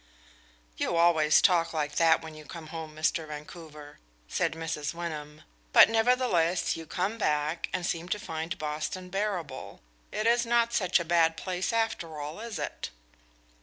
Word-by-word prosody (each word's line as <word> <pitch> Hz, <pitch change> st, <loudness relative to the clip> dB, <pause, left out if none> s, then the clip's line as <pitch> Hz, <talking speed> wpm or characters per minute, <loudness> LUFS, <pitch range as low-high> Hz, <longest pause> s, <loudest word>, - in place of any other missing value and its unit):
"You 170 Hz, -, 0 dB
always 160 Hz, -3 st, +5 dB
talk 170 Hz, -3 st, +4 dB
like 150 Hz, -2 st, -2 dB
that 165 Hz, -1 st, +4 dB
when 160 Hz, -1 st, -8 dB
you 155 Hz, 0 st, -11 dB
come 155 Hz, +1 st, -9 dB
home, 160 Hz, -2 st, -6 dB
Mr. 155 Hz, +1 st, 0 dB
Vancouver," 150 Hz, 0 st, -10 dB, 0.3 s
said -, -, 0 dB
Mrs. 160 Hz, -1 st, -4 dB
Wyndham. 155 Hz, -3 st, -6 dB, 0.3 s
"But -, -, +9 dB
nevertheless 225 Hz, -7 st, +2 dB
you 165 Hz, -1 st, -8 dB
come 195 Hz, +8 st, -2 dB
back 150 Hz, -2 st, 0 dB
and 180 Hz, -1 st, -2 dB
seem 170 Hz, -1 st, -2 dB
to 210 Hz, -, 0 dB
find 165 Hz, -5 st, -4 dB
Boston 155 Hz, +4 st, -4 dB
bearable. 185 Hz, -9 st, -3 dB, 0.3 s
It 215 Hz, -, -2 dB
is 235 Hz, +1 st, +4 dB
not 235 Hz, 0 st, +2 dB
such 185 Hz, -4 st, +3 dB
a 170 Hz, -, -3 dB
bad 165 Hz, -1 st, +3 dB
place 185 Hz, +2 st, -2 dB
after 225 Hz, -9 st, -1 dB
all, 150 Hz, +5 st, -6 dB
is 230 Hz, -1 st, -5 dB
it?" -, -, -4 dB
165 Hz, 160 wpm, -29 LUFS, 155-190 Hz, 0.3 s, But